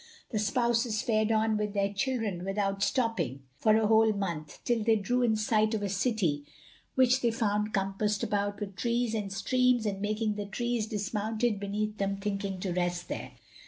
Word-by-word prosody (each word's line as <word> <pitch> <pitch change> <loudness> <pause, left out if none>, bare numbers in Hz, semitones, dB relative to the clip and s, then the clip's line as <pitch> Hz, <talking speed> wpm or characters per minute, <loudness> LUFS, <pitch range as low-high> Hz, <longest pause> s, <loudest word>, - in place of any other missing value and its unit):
The 215 - 0
spouses 230 +1 +1
fared 220 -3 +2
on 220 0 +2
with 210 -1 -2
their 200 0 +1
children, 220 -6 -1
without 195 0 -1
stopping, 195 - 0 0.2
for 215 0 +4
a 220 - +2
whole 220 0 +5
month, 170 -7 -4
till 235 -2 +1
they 225 0 +4
drew 230 +5 0
in 230 -3 +3
sight 215 +1 +2
of 210 - -2
a 200 - -1
city, 195 - 0 0.5
which 260 0 +4
they 235 - +3
found 210 -2 0
compassed 200 +1 0
about 205 0 -1
with 200 -2 -5
trees 235 +3 0
and 205 -3 -2
streams 250 +3 +2
and 195 -2 -2
making 215 0 -1
the 205 -1 -4
trees 235 +1 -1
dismounted 215 +1 -1
beneath 210 +1 -3
them 195 0 0
thinking 195 -1 -3
to 185 -2 -2
rest 175 0 -1
there. - - -5
210 Hz, 180 wpm, -29 LUFS, 195-225 Hz, 0.5 s, whole